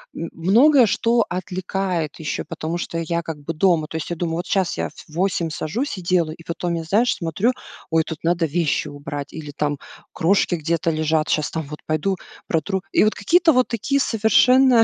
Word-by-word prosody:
м, 165 - -4
многое 240 - +5
что 230 +3 +2
отвлекает 185 -3 -3
ещё, 155 -2 -3
потому 160 +2 -4
что 170 -1 -4
я 170 +1 -1
как 160 -2 -6
бы 145 +3 -5
дома. 165 -2 +2
То - - -8
есть 160 - -5
я 175 - -2
думаю: 165 -1 -2
"Вот 175 - -3
сейчас 190 -3 0
я - - -2
в - - -21
в 155 - -15
8 180 -2 0
сажусь 205 - -3
и - - -6
делаю". 170 -3 +1
И 165 - -14
потом 170 +1 -3
я, 165 - -3
знаешь, 210 +9 +2
смотрю: 180 +8 0 0.4
"Ой, 160 0 +3
тут 160 -1 -7
надо 170 0 +2
вещи 160 -1 0
убрать 145 0 -7
или 150 -2 -7
там 145 -1 -1 0.4
крошки 180 0 +2
где-то 165 +1 0
лежат, 155 0 +1
щас 155 -1 +1
там, 160 - -3
вот 150 +1 -9
пойду 155 +5 0 0.3
протру". 190 +3 -1
И - - +4
вот 215 - +3
какие-то 335 - +4
вот 255 -1 +3
такие 250 +5 0
совершенно 245 +2 +5
170 Hz, 200 wpm, -22 LUFS, 160-200 Hz, 0.4 s, многое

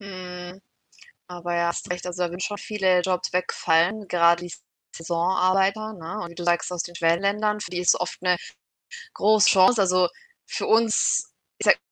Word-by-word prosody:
Mhm. 180 -1 -9 0.7
Aber 175 -1 -5
ja, 170 0 +1
hast 170 - -5
recht. 180 0 -4
Also, 180 0 -4
da 175 - 0
würden 175 +2 -8
schon 205 +2 -3
viele 190 -4 +1
Jobs 185 0 -2
wegfallen, 180 +3 +1
gerade 170 0 +3
die 175 - -9 0.4
Saisonarbeiter, 190 +5 0
ne? 180 +3 -7
Und 170 - -7
wie - - -13
du 175 - -7
sagst, 175 0 +1
aus 175 -1 -2
den 175 - -10
Schwellenländern, 200 +6 0
für - - -7
die 180 - -4
ist 180 - +4
es - - -6
oft 180 - -4
'ne 180 -1 +2 0.8
große 215 0 +4
Chance. 200 +4 +5
Also, 185 -1 +3 0.4
für - - -4
uns 225 -1 +2 0.3
ich - - -3
sage - - +6
180 Hz, 180 wpm, -24 LUFS, 175-200 Hz, 0.8 s, sage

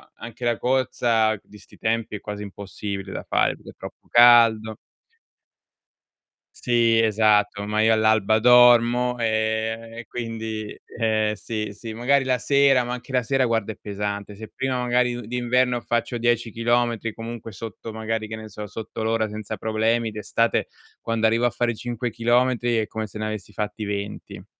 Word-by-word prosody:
anche 120 +1 -8
la 120 -1 +1
corsa 120 -4 +1
di 105 - -16
'sti - - -18
tempi 115 -1 -1
è - - -5
quasi 105 0 -6
impossibile 100 -1 -6
da - - -6
fare - - +2
perché - - -13
è - - -23
troppo - - -11
caldo 115 -2 +6 1.8
Sì, 115 -2 +2
esatto, 105 -2 +2
ma 105 +1 +1
io 110 +1 +4
all'alba 110 -1 +3
dormo 120 +1 +5
e 110 0 -1
e 120 - -7
quindi 110 -2 -5 0.2
eh, 110 -2 +1
sì, 105 -3 -5
sì 110 +2 -8
magari 135 +4 +2
la 130 -1 +1
sera, 140 -3 +3
ma 120 - -3
anche 125 +2 -8
la 125 -1 +1
sera 135 +1 +1
guarda 115 -1 -1
è - - -20
pesante. 100 0 -5
Se 110 +1 -9
prima 130 -1 -1
magari 125 0 +1
u - - -6
d'inverno 125 0 +1
faccio 120 +1 -1
10 120 -1 0
chilometri, 115 -1 0
comunque 115 -1 -7
sotto 110 +2 -8
magari, 110 0 -3
che 110 - -5
ne 110 0 -9
so, 105 0 -8
sotto 110 +1 -6
l'ora 110 0 +1
senza 105 0 -6
problemi 110 +1 0
d'estate, 110 +2 0 0.3
quando 115 -1 +1
arrivo 115 +2 +2
a - - +4
fare 120 -1 -1
5 120 +1 -4
chilometri, 120 +1 +1
è 110 - 0
come 110 0 -4
se 105 - -10
ne 110 - -3
avessi 110 -1 -5
fatti 105 +1 -4
20. 100 0 -6
115 Hz, 170 wpm, -23 LUFS, 110-120 Hz, 1.8 s, caldo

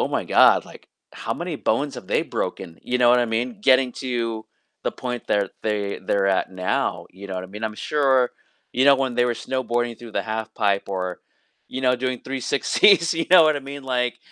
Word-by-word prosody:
"Oh - - +1
my - - -2
god," - - +5
like, - - -15 0.2
"How - - -4
many - - -4
bones 135 +5 -1
have 100 - -9
they - - +1
broken," 80 - -5
you 125 0 -1
know 120 - +5
what 125 - +5
I 120 - -1
mean. 120 - -2
Getting 130 - +4
to 115 -3 -3 0.4
the - - -1
point 125 -1 -4
that 100 -2 0
they 105 -2 -2
they're 95 +1 0
at - - -4
now, 90 0 -2
you 100 +2 -11
know 95 - -6
what 90 - -4
I - - -8
mean, 105 +2 -5
I'm 110 -1 -3
sure, 135 -4 +2 0.4
you 130 +2 +2
know, 140 -1 +7
when 130 -2 -1
they 120 - +3
were 120 - 0
snowboarding 120 -2 -2
through 115 -2 -11
the - - +1
half 110 0 -3
pipe, 100 -2 0
or, 90 -2 -4 0.5
you 130 - -5
know, 125 - +4
doing 130 0 -2
360s, 145 - +3
you 165 0 -1
know 180 -2 +9
what 155 -1 +3
I - - -4
mean, 140 -1 -8
like, 125 -2 -1
125 Hz, 220 wpm, -23 LUFS, 110-130 Hz, 0.5 s, know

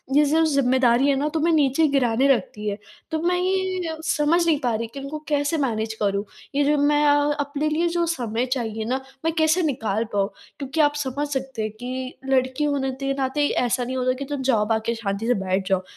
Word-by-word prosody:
ये 295 +1 +6
जो 315 +3 +3
ज़िम्मेदारी 260 -3 +3
है 280 - +3
ना 290 +3 0
तुम्हें 325 +1 +2
नीचे 300 +1 +3
गिराने 265 -2 +2
लगती 215 -4 0
है। 200 - -3 0.3
तो 320 - 0
मैं 355 +1 +1
ये 370 -2 -1
समझ 330 +3 +2
नहीं 320 -4 +2
पा 245 -4 0
रही 230 +1 -3
कि 275 - -6
उनको 275 +3 -6
कैसे 290 +2 +1
मैनेज 225 -6 -1
करूँ 200 -1 +1 0.3
ये 290 - +3
जो 295 +1 +2
मैं 295 +1 +3 0.3
अपने 285 +1 -1
लिए 325 +3 +1
जो 340 0 0
समय 245 -8 -1
चाहिए 225 -4 -2
ना 260 +3 -1 0.2
मैं 325 - +1
कैसे 320 +3 +3
निकाल 225 -8 -1
पाऊँ? 200 0 +1 0.3
क्योंकि 285 +3 -1
आप 290 0 +3
समझ 285 0 -2
सकते 265 -4 -4
हैं 215 0 -2
कि 255 +1 -5
लड़की 260 +1 +1
होने 280 -2 0
के 275 0 0
नाते 275 +2 +1
ऐसा 250 -1 0
नहीं 255 +2 -3
होता 255 0 +1
कि 280 - -4
तुम 285 -2 -3
जॉब 225 -5 +1
आके 225 +1 0
शांति 215 -1 -3
से 245 - +4
बैठ 190 0 -1
जाओ। 190 -1 +1
270 Hz, 210 wpm, -23 LUFS, 235-300 Hz, 0.3 s, ये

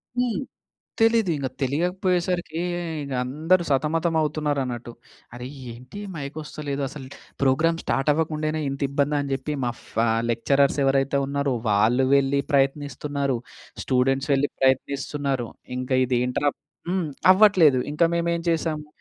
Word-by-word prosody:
హ్మ్. 245 -1 0 0.6
తెలీదు 225 -4 +4
ఇంగ 140 -3 -2 0.2
తెలియకపోయేసరికి 175 +3 0 0.4
ఇంగ 140 -1 -6
అందరూ 160 +8 +2
సతమతం 160 +4 +1
అవుతున్నారు 150 -2 0
అన్నట్టు. 120 -1 -6 0.4
అరే! 125 0 -7 0.3
ఏంటి 125 - -11
ఈ - - -9
మైక్ 140 0 -6
ఒస్తలేదు 145 -2 -5
అసలు. 135 -1 -9 0.4
ప్రోగ్రామ్ 160 +5 +3
స్టార్ట్ 135 +2 +1
అవ్వకుండానే 155 0 -1
ఇంత 140 - -6
ఇబ్బందా 140 +1 0
అని 140 -1 -4
చెప్పి 135 +3 -4
మా 120 - 0 0.2
ఫా 115 - +2 0.2
లెక్చరర్స్ 140 +5 +2
ఎవరైతే 135 +1 +2
ఉన్నారో 140 -1 -1 0.2
వాళ్ళు 110 +6 +3
వెళ్లి 140 0 +3
ప్రయత్నిస్తున్నారు. 140 0 0 0.5
స్టూడెంట్స్ 135 +2 +1
వెళ్ళి 140 +1 +2
ప్రయత్నిస్తున్నారు. 135 -1 0 0.3
ఇంక 130 +1 -5 0.2
ఇదేంట్రా 125 +3 +1 0.4
హ్మ్, 180 -3 0 0.2
అవ్వట్లేదు 185 -9 +5
ఇంక 150 - -1
మేమెం 170 0 0
చేసాము. 160 -2 -1
140 Hz, 125 wpm, -24 LUFS, 135-160 Hz, 0.6 s, అవ్వట్లేదు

